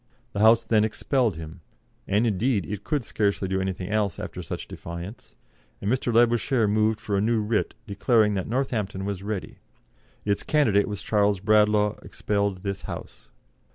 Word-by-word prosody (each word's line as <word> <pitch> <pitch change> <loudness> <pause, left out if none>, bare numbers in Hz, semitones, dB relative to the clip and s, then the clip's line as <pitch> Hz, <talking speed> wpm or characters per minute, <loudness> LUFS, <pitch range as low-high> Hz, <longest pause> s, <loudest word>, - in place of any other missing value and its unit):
The 100 - -3
House 110 +2 +6
then 110 -1 +3
expelled 110 - 0
him 80 +2 -9 0.5
and, 105 +4 +2
indeed, 110 -2 +1
it 105 +3 -5
could 150 -4 -1
scarcely 100 -3 0
do 95 0 0
anything 95 -1 -3
else 105 -3 0
after - - -6
such - - -6
defiance 85 - -8 0.4
and 100 - -1
Mr. 125 -1 0
Labouchere 120 0 +3
moved 110 +1 +2
for 100 - -2
a 100 - +2
new 115 +2 +2
writ, 105 +1 -1
declaring 105 +1 +2
that 95 -2 -2
Northampton 110 -6 -2
was 100 -2 -3
ready, 100 -1 -5 0.7
its 100 -1 +1
"candidate 110 -10 +2
was 105 -3 -5
Charles 105 -2 +2
Bradlaugh, 105 +1 +3
expelled 100 -2 -2
this 100 -1 -3
House." - - -8
105 Hz, 160 wpm, -25 LUFS, 100-110 Hz, 0.7 s, House